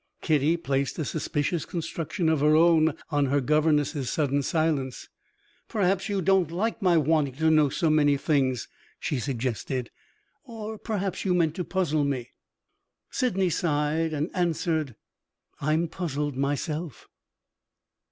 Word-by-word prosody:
Kitty 155 +1 +2
placed 140 -4 -1
a 155 - -2
suspicious 155 +2 -1
construction 170 +1 -3
of 160 -2 +2
her 150 +2 +4
own 160 -1 +4 0.2
on 145 -2 +2
her 140 +2 +2
governess's 150 -1 +1
sudden 145 -2 +1
silence. 145 -3 -1 0.6
"Perhaps 195 -1 0
you 200 -2 -1
don't 190 -2 +3
like 215 +8 -2
my 180 -3 +4
wanting 150 -3 +2
to 160 +2 +2
know 155 -2 +4
so 165 +5 0
many 145 -2 +4
things," 135 -4 0 0.3
she 140 - -2
suggested. 125 -1 -3 0.5
"Or 220 -4 -7
perhaps 200 -4 -3
you 185 -2 +1
meant 165 -3 +2
to 180 - -3
puzzle 165 -6 0
me?" 135 -4 -2 0.8
Sydney 195 -8 +1
sighed, 155 0 0
and 155 +2 -2
answered, 160 - -1 0.7
"I'm 155 +3 +1
puzzled 150 -5 -3
myself." 145 +2 -3
155 Hz, 130 wpm, -26 LUFS, 145-175 Hz, 0.8 s, her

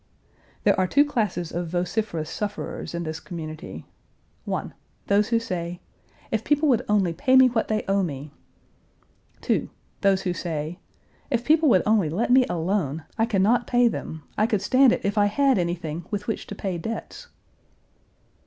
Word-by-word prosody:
There - - +5
are 185 - +2
two 285 +9 +4
classes 205 - -1
of 175 0 -3
vociferous 175 -1 -2
sufferers 205 -3 -5
in 170 - -2
this 160 0 -4
community: 160 -2 -8 0.6
1. - - -3 0.3
Those 205 +1 +3
who 230 0 +2
say, 175 -5 -4 0.5
"If 220 0 0
people 295 +3 +2
would 245 - +4
only 195 -5 +2
pay 255 +10 +2
me 260 -1 +8
what 230 -2 0
they 215 -1 0
owe 195 0 +2
me!" 145 -4 -4 1.1
2. - - 0 0.3
Those 195 -1 +3
who 180 - 0
say, 165 0 -4 0.5
"If 240 -3 0
people 310 0 +4
would 185 -7 +4
only 210 -7 +3
let 210 +10 -1
me 255 0 +6
alone. 165 -3 -1 0.2
I 225 - +3
can 195 -5 +2
not 240 +4 +2
pay 245 -1 +4
them. 160 -8 -4 0.2
I 215 - +4
could 210 -5 0
stand 260 +3 +5
it - - 0
if 205 +1 +1
I 205 - +5
had 270 +2 +2
anything 170 -2 -3
with 205 0 -3
which 225 - -3
to 205 - -7
pay 190 -3 -3
debts." 230 - -6
200 Hz, 170 wpm, -25 LUFS, 170-230 Hz, 1.1 s, me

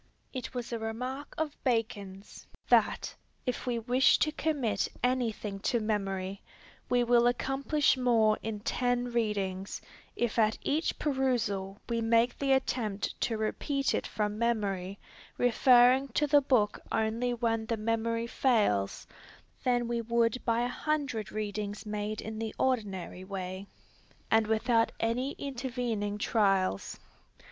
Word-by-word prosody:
It 255 -1 -6
was 245 -1 -4
a 230 - -2
remark 250 +6 -5
of 310 -2 -3
Bacon's, 210 -5 -3 0.2
that, - - +3 0.3
if 250 0 -3
we 240 -1 0
wish 245 +3 +4
to 305 - +1
commit 275 -11 0 0.2
anything 230 -5 -1
to 235 +4 +1
memory, 195 -3 -2 0.5
we 245 0 +3
will 240 0 +4
accomplish 270 +4 +1
more 230 -4 +3
in 215 -2 -4
ten 245 +1 0
readings, 200 -5 -1 0.4
if 240 0 0
at 215 -1 +3
each 310 +3 0
perusal 235 -9 0
we 230 -1 -1
make 230 +1 +2
the 275 -1 +1
attempt 230 -6 0
to 225 - 0
repeat 275 +6 -1
it - - -1
from 210 0 -2
memory, 200 -5 -1 0.4
referring 250 +2 +5
to 300 - +2
the 290 0 +5
book 240 -7 +2
only 225 +3 0
when 225 -2 -1
the 230 - -1
memory 230 +1 -1
fails, 215 - +1 0.6
than 245 -1 +1
we 235 0 -1
would 235 +1 +1
by 230 0 +1
a 245 - +1
hundred 270 -5 -2
readings 210 -1 -4
made 210 0 -3
in 220 0 -6
the 225 -1 -4
ordinary 200 -8 -1
way, 190 0 -5 0.6
and 220 -1 +4
without 225 +1 +2
any 245 +5 0
intervening 245 -6 -3
trials. 195 - +1
230 Hz, 135 wpm, -30 LUFS, 210-250 Hz, 0.6 s, referring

